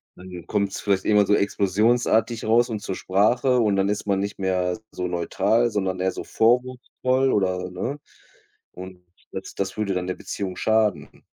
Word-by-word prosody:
dann 90 -1 -10
kommt's 100 -1 -1
vielleicht 100 -2 0
irgendwann 105 -1 +4
so 105 - +2
explosionsartig 110 +4 +1
raus 120 +2 +3
und 110 -2 -3
zur 95 - -4
Sprache 120 +7 +2
und 105 -3 +2
dann 100 +1 +1
ist 105 0 -2
man 100 -1 +1
nicht 100 0 -4
mehr 90 0 -1
so 90 - -3
neutral, 100 +7 +1
sondern 95 -4 -2
eher 95 0 +1
so - - -6
vorwurfsvoll 130 +2 +1
oder, 90 -2 0
ne? 120 +11 -4 0.7
Und 90 0 -11 0.3
das 95 - -7
das 95 -1 -3
würde 105 -2 -1
dann 90 0 -2
der 95 - -2
Beziehung 95 -2 -5
schaden. 105 -9 0
100 Hz, 170 wpm, -23 LUFS, 95-110 Hz, 0.7 s, irgendwann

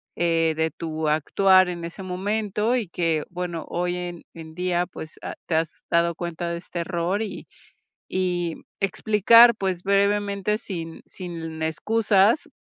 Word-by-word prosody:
eh, 165 -1 +2
de 160 0 +1
tu 160 0 -4
actuar 185 +5 +4
en 170 -1 -5
ese 175 +3 -8
momento 210 +4 -1
y 230 -7 -1
que, 165 -3 0
bueno, 175 -2 -4
hoy 175 +1 -1
en 175 -1 -5
en 160 -1 -10
día, 180 -1 0
pues 160 -3 -10
ha - - -4
te 160 - 0
has 160 0 -2
dado 170 0 +3
cuenta 170 0 -4
de 170 - -3
este 175 0 -7
error 175 +3 -1
y 210 - -7 0.6
y 175 -3 -1 0.3
explicar, 220 +4 +6
pues 190 -4 -2
brevemente, 200 +1 +1
sin 165 -6 -6
sin 165 -3 -7
excusas, 205 - +2
180 Hz, 150 wpm, -24 LUFS, 165-200 Hz, 0.6 s, explicar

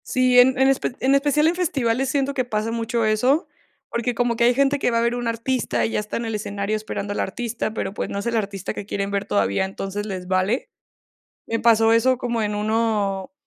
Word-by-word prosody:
Sí, 255 -1 +4
en 255 +1 +5
en 265 - +5
espe 270 -2 +1
en 265 +1 +2
especial 290 +2 +3
en 335 - +1
festivales, 270 -7 0
siento 280 0 0
que 260 - 0
pasa 220 -2 -2
mucho 230 0 -1
eso, 250 +9 +2 0.4
porque 235 +1 -2
como 240 0 +1
que 235 - +2
hay 245 - +5
gente 280 +1 +2
que - - +1
va 230 - +1
a - - +2
ver 235 +1 +1
un 245 -1 -3
artista 230 +2 -1
y - - -2
ya - - 0
está 210 0 -4
en 235 - -3
el 225 - -3
escenario 200 0 -2
esperando 210 -1 -4
al - - -4
artista, 230 +1 -3
pero, 195 -3 -3
pues, - - -4
no - - -4
es 200 - -6
el 235 0 -1
artista 200 -2 -3
que 205 - -6
quieren 200 -1 -2
ver 200 -1 -1
todavía, 100 - +1
entonces 195 +1 -5
les 185 -3 -5
vale. 190 +6 0 0.8
Me 230 - -1
pasó 225 -1 +4
eso 255 +3 +3
como 235 -2 -2
en 210 0 -1
uno 210 -2 -1
230 Hz, 230 wpm, -22 LUFS, 205-250 Hz, 0.8 s, en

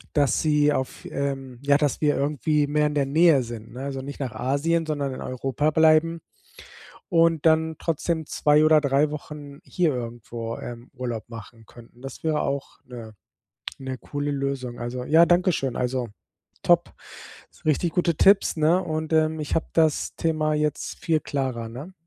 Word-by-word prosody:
dass 145 -3 +2
sie 150 -1 +3
auf 130 -2 -4
ähm 135 -3 -4
ja, 140 0 +3
dass 145 -3 -1
wir 150 -1 +3
irgendwie 145 +1 0
mehr 150 +1 +2
in 150 - -4
der 140 - +2
Nähe 150 -1 +4
sind, 115 -1 -9
ne, 125 - -7
also 135 -1 -4
nicht 140 +2 -8
nach 130 -5 -4
Asien, 160 +5 0
sondern 145 -3 -2
in - - -8
Europa 135 +3 -1
bleiben. 160 +1 +4 0.9
Und 165 -2 +3
dann 160 0 +3
trotzdem 165 0 -2
2 150 +1 +3
oder 155 0 +6
3 140 +1 +2
Wochen 145 -1 -8
hier 175 -5 0
irgendwo, 115 -1 -6
ähm, 120 0 -9
Urlaub 120 -4 -5
machen 115 0 -11
könnten. 120 +2 -17
Das 135 +4 -9
wäre 155 -1 +1
auch 140 0 -4
'ne 115 -3 -10 0.7
'ne 130 -1 -5
coole 145 +2 -4
Lösung. 135 -3 -3
Also 120 +1 -4
ja, 165 +4 +6
dankeschön. 175 -7 +1
Also 125 -1 -1 0.6
top. - - +3 0.7
Richtig 155 +3 +1
gute 175 -2 +1
Tipps, 195 +5 +4
ne, 160 +4 +3
und, 155 0 -3
ähm, 160 0 +2
ich 150 - -3
habe 160 - 0
das 160 -2 +1
Thema 155 -2 0
jetzt 150 -1 -2
viel 160 -2 +1
klarer, 130 -5 -3
ne? 140 +11 -9
145 Hz, 165 wpm, -24 LUFS, 130-155 Hz, 0.9 s, oder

